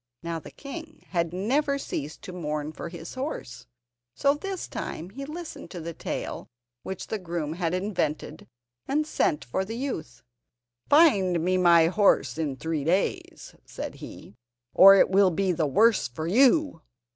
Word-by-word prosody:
Now 170 -1 -3
the - - -11
king 310 +2 -10
had 170 -2 0
never 275 - 0
ceased 150 - -5
to 185 - -8
mourn 150 -3 -3
for 165 - -7
his 170 -1 -9
horse, 260 - -6 0.5
so 280 0 +3
this 380 +5 -5
time 170 +4 -6
he 275 +6 -7
listened 325 +3 -8
to 180 - -7
the 165 +1 -6
tale - - -5 0.3
which 190 -1 -6
the 220 - -4
groom 170 -4 -4
had 170 0 -1
invented, 185 -5 -3 0.4
and 300 +3 +1
sent 155 - 0
for 125 +10 -2
the 225 +4 -6
youth. 160 - -5 0.7
"Find 200 - +5
me 185 +1 +2
my 170 -3 +6
horse 185 -2 +2
in 145 -4 -1
three 160 +1 -3
days," 180 +6 -1
said - - -7
he, - - -11 0.4
"or 195 +1 +9
it 190 - +4
will 195 0 +5
be 185 +2 0
the 165 -3 0
worse 220 - +3
for 155 +6 -6
you." 260 - +3
185 Hz, 160 wpm, -26 LUFS, 165-260 Hz, 0.7 s, or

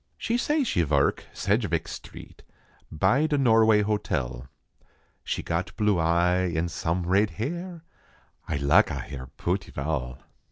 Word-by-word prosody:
She 230 - -1
say 295 +4 +1
she 90 - +1
verk 70 -2 +1
Saidgeveck - - 0
street - - -10 0.5
By 100 - +2
da 150 -2 0
Norway 110 -5 +4
hotel; 65 - -2 0.8
She - - -3
got 85 +2 -3
blue 105 -4 +2
eye 90 +2 +2
en 85 +2 0
some 85 +1 -2
rade 100 +4 +3
hair 170 - -4 0.7
Ay - - 0
laka 70 +1 +3
hare 65 -2 -7
pooty 95 +3 -2
val. 70 -3 -3
90 Hz, 130 wpm, -26 LUFS, 80-115 Hz, 0.8 s, Norway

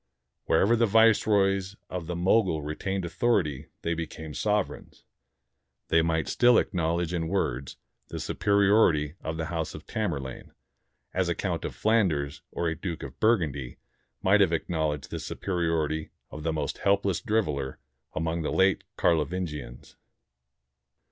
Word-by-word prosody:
Wherever 115 +4 +4
the 115 0 +3
viceroys 100 -3 +3
of 90 -3 -5
the 90 - -3
Mogul 90 -3 +2
retained 95 +5 -3
author 110 +5 +2
ity 75 -2 -6 0.2
they 85 - 0
became 80 -1 -6
sovereigns. 105 +2 -2 0.9
They 80 - +5
might 80 -1 0
still 120 0 +4
acknowl 85 -5 +1
edge 85 +1 -4
in 80 -2 -1
words 70 -8 -2 0.3
the - - -6
superiority 100 -6 +3
of 80 0 -3
the 80 - -2
house 80 -2 -2
of - - -10
Tamerlane; 75 -12 -4 0.6
as - - +1
a - - 0
Count - - -2
of - - -5
Flanders 90 -11 +1
or 85 - -1
a 80 - -1
Duke 85 -1 -5
of 70 -1 -9
Burgundy 75 - +1 0.5
might - - +5
have - - +4
acknowledged 80 -4 -2
the - - -3
superiority 80 -4 -1 0.2
of 75 - -7
the 80 +1 -1
most 80 -1 -3
helpless 100 -2 +1
driveler 75 - -1 0.4
among 80 +1 -1
the 75 - -2
later 95 +1 +3 0.2
Carlovingians. 75 -5 -1
85 Hz, 140 wpm, -27 LUFS, 75-100 Hz, 0.9 s, They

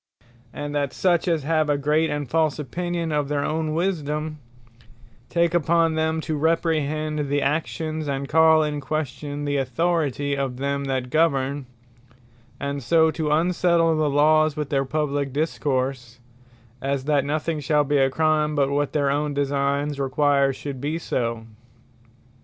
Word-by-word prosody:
Wisedome - - -38 0.4
And 145 - -5
that 140 -2 -1
such 180 -1 +1
as 165 -4 +1
have 155 0 +1
a 145 - +2
great, 150 +3 +1
and 145 -1 -3
false 155 +1 +1
opinion 170 +3 -3
of 150 -2 0
their 145 0 -1
own 155 0 -1
Wisedome, 155 -3 -2 0.9
take 170 -1 +1
upon 165 -1 +2
them 160 0 0
to 155 -1 -3
reprehend 155 -2 0
the 145 0 +1
actions, 155 +1 -2
and 140 0 -2
call 160 +1 +5
in 150 -1 -2
question 145 0 -4
the 145 0 0
Authority 145 0 0
of 135 -3 -3
them 140 +1 -2
that 130 -2 -2
govern, 140 -3 +1 0.9
and 140 0 -3
so 160 +5 +3
to 155 -1 -2
unsettle 170 +1 +2
the 155 -1 +1
Lawes 155 +1 +3
with 150 -2 -4
their 135 -1 +1
publique 145 -1 -2
discourse, 130 -5 -2 0.6
as 135 -1 -2
that 145 -2 +2
nothing 155 +2 -2
shall 150 +1 +2
be 145 0 +1
a 135 0 +4
Crime, 155 +1 +1
but 140 -1 +1
what 145 0 0
their 140 -2 +1
own 145 0 -1
designes 140 +1 0
require 140 0 +2
should 135 -1 -7
be 150 +3 -2
so. 115 -8 -2
150 Hz, 155 wpm, -23 LUFS, 140-160 Hz, 0.9 s, call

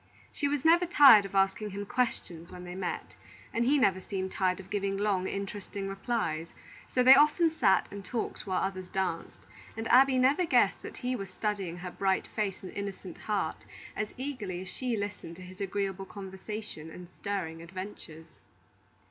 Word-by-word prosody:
She 285 - -1
was 285 0 -1
never 345 +2 +5
tired 275 - +8
of 195 - -8
asking 195 +2 +2
him 200 +1 -5
questions 180 -8 -2
when 180 - -9
they 180 0 -7
met, 185 -1 -4 0.4
and 230 - +1
he 285 +4 +4
never 195 -8 +3
seemed 190 -1 -4
tired 185 -1 0
of 190 +1 -12
giving 200 -1 -1
long, 195 -2 +1
interesting 200 0 -5
replies; 195 -5 -2 0.4
so 250 - +2
they 260 +1 +10
often 300 +4 +5
sat 210 -11 +3
and 200 0 -7
talked 225 -1 -4
while 185 -1 0
others 185 -1 -4
danced, 190 -4 -3 0.3
and 225 0 -3
Abby 260 +1 +6
never 270 +7 +4
guessed 335 - +3
that - - -9
he 250 0 -2
was 195 -5 -5
studying 195 -3 -3
her 180 0 -6
bright 190 +1 0
face 205 -4 -3
and 185 - -7
innocent 200 -3 -6
heart 205 -6 -2 0.3
as 215 0 -3
eagerly 220 -10 -4
as 190 - -8
she 245 +3 -2
listened 205 -5 -5
to 185 - -11
his 185 +2 -11
agreeable 195 -1 -2
conversation 190 -3 -7
and 175 +2 -10
stirring 180 -4 -4
adventures. 170 -3 -9
195 Hz, 175 wpm, -30 LUFS, 185-225 Hz, 0.4 s, they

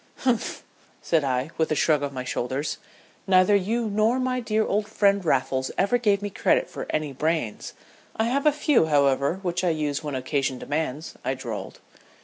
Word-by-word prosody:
"Humph!" 250 -4 -1 0.4
said 160 -3 +2
I, 130 +2 -1
with 160 - +1
a - - +2
shrug 150 0 +2
of 140 -1 -2
my 130 -2 -5
shoulders. 130 +3 -3 0.5
"Neither 185 +1 +5
you 220 +4 0
nor 215 +4 +2
my 255 0 0
dear 220 -2 0
old 210 +1 0
friend 200 -2 +2
Raffles 130 -4 0
ever 220 +5 +2
gave 205 -3 +2
me 205 - -3
credit - - +2
for - - -7
any 150 -2 -2
brains. 155 -5 -2 0.4
I 220 - +1
have 275 +6 +1
a - - +7
few, 295 - +2
however, 140 0 +2
which 180 0 -1
I 180 - +3
use 150 -2 -1
when 145 -2 -4
occasion 130 0 -1
demands," 150 +2 -3
I 130 - -1
drawled. 120 -5 -7
160 Hz, 180 wpm, -25 LUFS, 140-215 Hz, 0.5 s, a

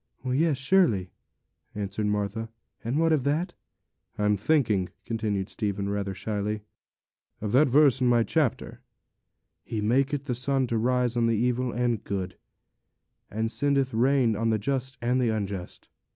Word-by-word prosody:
'Yes, 140 +3 +1
surely,' 135 - +2 0.6
answered 105 +1 -2
Martha; 105 +2 -2 0.3
'and 120 +5 -1
what 165 0 +3
of 145 -5 +1
that?' 160 +6 0 0.6
'I'm 105 0 +2
thinking,' 105 - +1 0.2
continued 110 -4 -2
Stephen, 100 -2 -3
rather 100 -1 -2
shyly, 105 +1 -3 0.8
'of 105 -1 -3
that 135 +4 +4
verse 135 -1 +4
in 125 - +3
my 120 -1 +4
chapter: 150 -1 -1 0.8
"He 110 - -4
maketh 135 +6 +1
the 135 -4 -2
sun 130 +2 +1
to 115 -2 -1
rise 125 +1 +1
on 120 -1 +2
the 115 -1 +1
evil 125 +2 0
and 120 -2 0
the - - -30
good, 95 -2 -4 0.9
and 110 +2 -2
sendeth 135 +2 +1
rain 125 -1 +3
on 115 +2 0
the 110 - +2
just 130 +4 -2
and 125 +2 +2
the 120 - +2
unjust." 100 -4 -4
115 Hz, 150 wpm, -27 LUFS, 105-135 Hz, 0.9 s, that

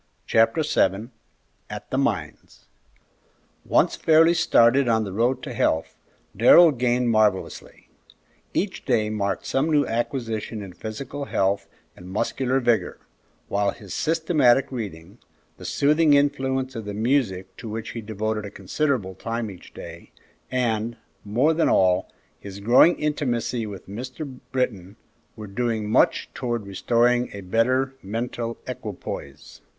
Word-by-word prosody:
Chapter 115 +7 +3
VII 100 -2 +1 0.6
AT - - -8
THE - - 0
MINES - - -3 1.0
Once - - +2
fairly 165 +1 +5
started 130 -5 +4
on 110 -1 +2
the 100 -3 -6
road 120 +5 0
to - - -5
health, 80 0 0 0.4
Darrell 175 -2 +7
gained 125 -2 +1
marvellously. 110 -3 0 0.6
Each 190 0 -2
day 110 -4 +1
marked 100 -2 -2
some 135 +4 0
new 150 -2 +3
acquisition 115 -2 -3
in 95 -2 -10
physical 130 +9 -6
health 100 -5 0 0.3
and 90 +1 -12
muscular 130 +6 0
vigor, 120 -3 0 0.5
while 100 0 +1
his 100 -2 -8
systematic 155 -6 +2
reading, 100 -4 -7 0.4
the - - -11
soothing 150 +1 +3
influence 135 -2 0
of 115 -2 -5
the 105 -1 -5
music 110 -5 0
to 115 - -8
which 110 +1 -5
he 115 - -6
devoted 110 0 -3
a 100 - -6
considerable 100 +1 -2
time 115 +2 -4
each 90 - -14
day, - - -10 0.4
and, 115 -2 -1 0.3
more 125 +10 +2
than 160 +1 +2
all, 90 -1 +2 0.3
his 100 -1 -9
growing 120 +11 +5
intimacy 125 -6 -1
with 100 -3 -9
Mr. 125 +6 -7
Britton, 105 -7 -2 0.4
were 110 - -8
doing 110 +1 -2
much 125 - +3
towards 120 -4 -3
restoring 120 +5 +1
a 100 - -7
better 130 +7 +1
mental 115 +3 -4
equipoise. 115 -6 -7
115 Hz, 135 wpm, -24 LUFS, 105-130 Hz, 1.0 s, Darrell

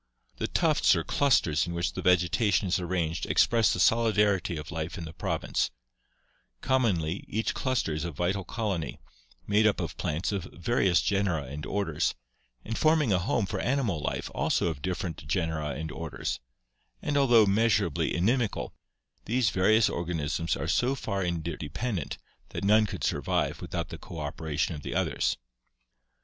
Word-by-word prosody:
The - - -1
tufts - - +3
or - - 0
clusters 100 - +2
in 85 - -4
which 85 - -1
the - - -4
vegetation 90 +4 +3
is 90 - +2
arranged 85 -3 -2
express 115 -4 +4
the - - -1
solidarity 105 -5 +3
of 75 +1 -7
life 80 +2 -4
in 85 - -5
the 80 - -8
province; - - -1 0.9
commonly 100 -10 +1
each 110 +2 -1
cluster 130 - 0
is 75 0 -2
a 85 - -2
vital 90 +5 -1
colony, 95 - -3 0.5
made 105 +1 +4
up 105 - +1
of 85 -5 -4
plants 80 +7 -1
of 100 -3 -2
various 95 -2 +2
genera 95 -7 +1
and 70 +3 -7
orders; 100 -6 0 0.5
and 115 +1 -3
forming 155 -8 +3
a 90 - +3
home 100 +4 0
for - - -3
animal 120 - 0
life - - -3
also - - +1
of 75 -4 -5
different 85 -4 -4
genera 80 -2 -1
and 80 +1 -5
orders; 80 +1 -4 0.6
and, 150 - -1
although 120 -6 +6
measurably 100 -5 +2
inimical, 115 +5 0 0.5
these 115 -4 +2
various 105 +5 +4
organisms 80 -1 -2
are 80 - -3
so 125 - +2
far 100 -7 -3
inter 85 -2 -2
dependent 90 - -3 0.3
that - - -5
none 105 +2 +5
could - - -6
survive - - 0
without - - -4
the - - -8
cooperation 80 0 -3
of 75 - -7
the - - -5
others." - - 0
90 Hz, 160 wpm, -28 LUFS, 80-110 Hz, 0.9 s, although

